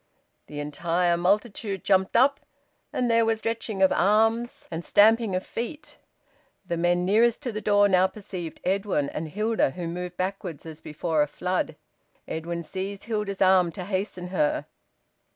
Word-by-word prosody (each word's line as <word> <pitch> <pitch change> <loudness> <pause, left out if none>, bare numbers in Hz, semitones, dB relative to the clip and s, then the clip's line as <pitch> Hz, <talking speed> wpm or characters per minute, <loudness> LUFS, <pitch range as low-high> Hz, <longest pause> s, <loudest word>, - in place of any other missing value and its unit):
The 145 - -7
entire 170 +4 0
multitude 195 +2 0
jumped 190 -1 +2
up, 275 +4 +4 0.5
and 250 - 0
there 230 -1 +4
was 225 0 +1
stretching 220 -3 -2
of 190 - +5
arms 225 +5 +2
and 165 +1 -4
stamping 220 0 +4
of 185 - -2
feet. 295 +6 -6 0.7
The 170 - -2
men 175 +1 +1
nearest 230 +7 +3
to 250 - -2
the 215 0 -5
door 205 0 +4
now 185 -1 +4
perceived 190 -6 -8
Edwin 190 -7 0
and 155 0 -4
Hilda, 215 +1 +1
who 170 +5 -5
moved 180 +1 -5
backwards 185 -5 -4
as 160 -1 -9
before 155 +1 -1
a 150 - +2
flood. 180 +5 -2 0.5
Edwin 170 +1 -4
seized 195 +4 -5
Hilda's 210 -4 -1
arm 185 -2 +4
to 185 - -6
hasten 185 -2 -3
her. 165 -5 0
190 Hz, 155 wpm, -26 LUFS, 175-215 Hz, 0.7 s, of